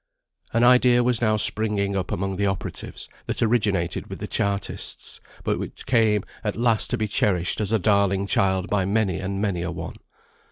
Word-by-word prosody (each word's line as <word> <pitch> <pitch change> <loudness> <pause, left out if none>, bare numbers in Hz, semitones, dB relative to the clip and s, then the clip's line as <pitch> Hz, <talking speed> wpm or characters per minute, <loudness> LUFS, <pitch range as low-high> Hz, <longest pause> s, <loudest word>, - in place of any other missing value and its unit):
An 115 +1 +2
idea 125 0 +5
was 120 -1 0
now 110 -2 +2
springing 105 -2 +2
up 95 -3 -2
among 95 +1 -2
the 100 0 +1
operatives, 95 -1 -5 0.2
that - - 0
originated 100 -7 0
with - - -7
the - - -6
Chartists, 100 0 -2 0.2
but - - -1
which - - -7
came 110 -5 +2 0.2
at 105 -2 -2
last 115 -2 +2
to - - 0
be 110 - -1
cherished 95 -2 +1
as 105 -1 -1
a 110 - +4
darling 100 -1 +2
child 95 -1 +1
by 100 -2 +1
many 100 -2 0
and 95 +1 -3
many 100 -4 -1
a 90 - -3
one. 85 -1 -6
100 Hz, 185 wpm, -24 LUFS, 95-110 Hz, 0.2 s, idea